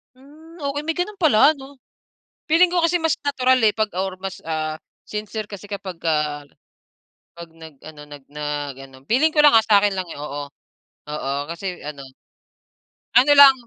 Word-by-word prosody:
Hmm, 310 +6 -17
okay 285 +1 -2
may 325 +1 -2
ganun 390 +2 -3
pala 300 0 +5
'no? 275 -1 -13 0.7
Feeling 345 +2 +5
ko 350 - +2
kasi 350 +1 +2
mas 325 -1 +2
natural, 260 -2 +2
eh, 215 - +4
pag 215 -1 0
or 190 -1 -2
mas, 195 -1 -6
ah, 155 -1 -2 0.3
sincere 215 0 -5
kasi 200 0 -9
kapagka, 160 -7 -3 0.9
pag, 170 -1 -10
nag 160 -3 -13
ano, 155 -1 -11
nag 145 -2 -11
nag 145 -2 -4
ano, 130 - -16
feeling 280 +7 +4
ko 300 - +6
lang 290 - +7
ah, 225 - +7
sakin 205 -2 +4
lang 185 -2 -4
yun. - - -8
Oo, 145 -1 -5 0.7
oo, 135 -2 -4 0.2
kasi 180 +1 -6
ano. 145 -2 -7 1.2
Ano 270 +4 +6
lang. 280 -1 +10
205 Hz, 165 wpm, -21 LUFS, -, 1.2 s, lang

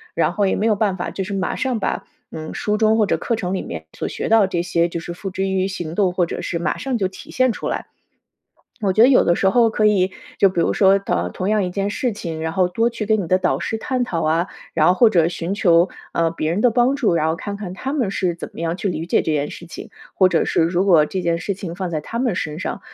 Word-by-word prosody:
然 - - +1
后 205 - +1
也 - - 0
没 215 - 0
有 215 - +3
办 200 -2 0
法， 175 - -3
就 195 - -4
是 200 +2 -5
马 190 -2 -1
上 255 -3 -1
把， - - -2 0.3
嗯， 155 0 -7
书 210 - -1
中 220 0 +3
或 215 - +4
者 - - +1
课 230 -3 -2
程 180 -3 -3
里 190 - -1
面 80 -2 -7
所 - - -3
学 - - -4
到 220 -3 +5
这 175 -2 -1
些， 170 0 +1
就 170 - -4
是 170 +1 -6
付 195 +3 -6
之 190 +1 -2
于 190 -1 0
行 170 -4 -5
动， 195 -2 +2
或 180 0 +1
者 - - -5
是 170 - -3
马 170 - -1
上 260 -2 -2
就 195 -4 0
体 185 - -12
现 255 -2 +2
出 - - -4
来。 - - -3 1.0
我 195 - +2
觉 215 - +1
得 235 - +9
有 270 - +6
的 170 - +2
时 190 - +2
候 230 +3 +4
可 215 -1 +2
以 195 -3 +3 0.3
就 195 - +7
比 180 -2 -1
如 - - +2
说， 195 0 +4
同 90 - -2
同 185 - -3
样 215 -1 +2
一 180 - -3
件 195 +2 -2
事 250 +4 -1
情， 170 -7 -5
然 160 0 -2
后 185 +1 +2
多 225 +7 0
去 230 -3 -5
跟 215 -1 +2
你 170 - -6
的 185 - +3
导 - - 0
师 225 - -3
探 255 +2 -1
讨 170 -9 -2
啊， 165 +4 +1 0.3
然 155 0 +4
后 - - +6
或 235 +4 +6
者 170 -6 +3
寻 175 +2 -3
求， 175 -2 +4 0.2
呃， 165 -1 +1
别 155 -1 -2
人 175 +5 0
的 245 - +5
帮 245 +4 +2
助， 235 -11 +1
然 160 -1 +1
后 160 - 0
看 200 +3 -5
看 200 -3 -6
他 265 +8 -4
们 250 -10 0
是 185 -3 -1
怎 170 - -8
么 - - -14
样 165 +1 -2
去 195 - -2
理 165 -2 -3
解 - - +2
这 160 - -2
件 145 -1 -1
事 170 - -10
情， - - -9 0.3
或 185 -1 +5
者 165 - +2
是 - - +1
如 175 +3 +1
果 165 -6 +5
这 190 - -3
件 170 -1 0
事 200 +3 -3
情 180 -3 -7
放 185 -2 -3
在 155 - -2
他 230 +9 -6
们 245 -5 0
身 155 -3 -3
上， 185 - -4
190 Hz, 310 characters per minute, -20 LUFS, 170-215 Hz, 1.0 s, 得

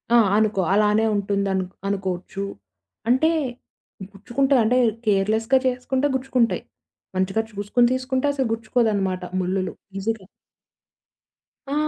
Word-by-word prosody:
ఆ! - - +8 0.2
అనుకో, 215 -3 +2
అలానే 210 +1 +3
ఉంటుందను 200 -2 0 0.2
అనుకోచ్చు. 195 -1 -3 0.7
అంటే 260 +6 +4 0.8
గుచ్చుకుంటాయ 255 +7 +1
అంటే 245 +3 +3 0.3
కేర్లెస్‌గా 220 +5 +2
చేసుకుంటే 260 +2 0
గుచ్చుకుంటాయి. 255 -3 +1 0.5
మంచిగా 190 +3 +1
చూసుకొని 205 +4 +2
తీసుకుంటే 260 +1 -1
అసలు 265 -4 0
గుచ్చుకోదన్నమాట, 215 -5 0 0.2
ముల్లులు 185 +1 -1 0.2
నిజంగా. 205 0 -3 1.4
ఆ! - - -2
215 Hz, 95 wpm, -23 LUFS, 195-250 Hz, 1.4 s, ఆ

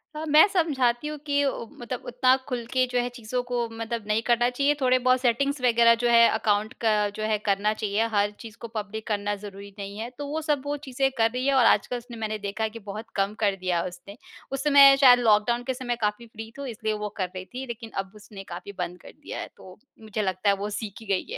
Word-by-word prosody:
हाँ, 310 +1 -4
मैं 305 +5 +7
समझाती 290 -8 +1
हूँ 300 0 -5
कि 285 0 +1
ओ, 250 -3 -2
मतलब 245 +1 -5
उतना 255 +1 +3
खुल 245 -3 -3
के 255 0 +3
जो 250 - +1
है 245 0 -1
चीज़ों 245 +1 -3
को 245 -1 -2
मतलब 225 0 -5
नहीं 215 +1 +1
करना 240 0 +3
चाहिए। 280 +4 +1
थोड़े 255 0 +4
बहुत 255 0 +2
सेटिंग्स 275 +3 +1
वगैरह 235 -1 +5
जो - - +4
है 235 0 +7
अकाउंट 215 +1 0
का 220 -2 +3 0.2
जो 215 - -4
है 215 -1 +1
करना 205 +1 +1
चाहिए। 215 +1 -1
हर 205 0 +2
चीज़ 225 -2 -11
को 235 - -5
पब्लिक 220 0 -6
करना 205 -1 -1
ज़रूरी 200 0 -10
नहीं 200 +1 -6
है। 230 +2 -5
तो 290 -1 -5
वो 315 +2 -3
सब 295 -3 0
वो 290 +1 -2
चीज़ें 270 +1 +1
कर 225 0 +3
रही 250 +1 -3
है। 275 - +3
और 255 -3 +5
आज 210 - +4
कल 250 - -3
उसने 240 -1 -10
मैंने 215 -1 -3
देखा 200 +2 -4
है 220 - 0
कि 230 +1 -10
बहुत 210 +2 -8
कम 200 +1 0
कर 200 -3 +2
दिया 180 -2 -1
है 185 - -3
उसने। 180 +4 -11 0.3
उस 270 +1 -3
समय 280 -2 +8
शायद 245 -2 +8
लॉक 210 -3 +4
डाउन 240 +1 0
के 260 +1 -2
समय 245 -1 -3
काफ़ी 210 +3 -1
फ्री 225 0 -9
थी 280 -2 -5
इसलिए 220 -1 -2
वो 210 0 -4
कर 185 -3 -1
रही 185 0 -6
थी 255 +4 -7
लेकिन 235 -1 -7
अब 195 -1 -3
उसने 205 -2 -11
काफ़ी 200 +3 -7
बंद 180 0 -4
कर - - -12
दिया - - -6
है। - - -6
तो 185 -1 -13 0.2
मुझे 215 0 -4
लगता 190 +1 0
है 200 - +4
वो 200 +1 -4
सीख 210 -1 -5
ही - - -11
गई 200 - -1
है। - - -3
230 Hz, 260 wpm, -26 LUFS, 210-255 Hz, 0.3 s, समय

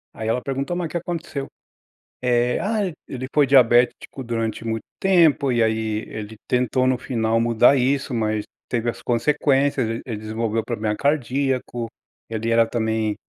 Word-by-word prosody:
Aí 110 - -5
ela 125 +2 0
perguntou: 140 +6 -3
"Mas 175 -1 -2
o - - -13
que 170 - -2
aconteceu?". 165 -4 -4 0.8
Eh, 125 0 +2
"Ah, 215 +2 -1 0.3
ele 130 0 -5
foi 145 -2 +6
diabético 125 0 +3
durante 115 -1 -3
muito 110 -1 -2 0.2
tempo. 165 -8 +4
E 120 -1 +2
aí 110 -1 0
ele 110 0 -7
tentou 125 +1 +1
no 130 -1 +2
final 115 -2 0
mudar 120 +3 +4
isso, 135 +1 0
mas 110 -2 0 0.3
teve 120 -1 0
as - - -6
consequências. 135 +1 +1
E 115 +1 -3
ele 115 -4 -4
desenvolveu 110 +1 -2
o - - -17
problema 110 -3 -2
cardíaco. 130 -3 -1 0.4
Ele 115 0 -2
era 115 0 +5
também 110 -2 -1
120 Hz, 160 wpm, -22 LUFS, 110-135 Hz, 0.8 s, foi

